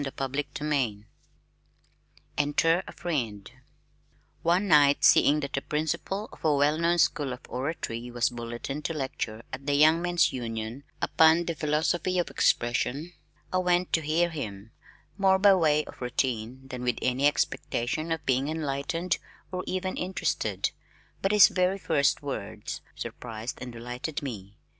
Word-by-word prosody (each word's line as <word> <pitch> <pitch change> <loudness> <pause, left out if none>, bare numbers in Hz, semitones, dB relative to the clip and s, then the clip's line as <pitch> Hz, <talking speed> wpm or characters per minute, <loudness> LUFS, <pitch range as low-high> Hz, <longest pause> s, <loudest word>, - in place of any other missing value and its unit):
CHAPTER 135 0 -3
XXVII 140 -8 -2 1.3
Enter 165 +4 +2
a - - -7
Friend 115 - -3 0.9
One 175 +4 +2
night 145 -4 +5
seeing 150 +1 +6
that 140 0 -5
the 135 - -1
principal 155 +8 -2
of - - -15
a 155 -2 +3
well 145 +2 +2
known 170 +1 +2
School 145 -4 +2
of 125 - -9
Oratory 125 -3 -4
was 120 -1 +1
bulletined 120 +4 -5
to 165 - -2
lecture 120 -5 -4
at 135 +2 -7
the 145 - +2
Young 155 +3 +5
Men's 175 0 +2
Union 115 +2 -5 0.2
upon 160 +2 +5
"The 170 - -1
Philosophy 160 +4 0
of 175 - 0
Expression" 135 +7 +1 0.4
I 185 - +3
went 180 0 +1
to 165 - +3
hear 165 +3 +1
him, 110 -8 -6 0.5
more 190 -1 +5
by 200 +1 +6
way 155 -4 +3
of - - -13
routine 125 0 -2
than 125 -2 -6
with 125 0 0
any 130 +3 +3
expectation 145 +1 -1
of 165 -1 -2
being 130 +1 +1
enlightened 160 +3 -2 0.3
or 185 0 -3
even 185 0 -2
interested, 185 +1 -1 0.5
but 195 - +1
his 210 -2 +8
very 185 +1 +1
first 160 -6 +1
words - - -5
surprised 115 0 -6
and 125 -1 -6
delighted 125 +6 -5
me. 105 -7 -7
145 Hz, 150 wpm, -28 LUFS, 125-170 Hz, 1.3 s, his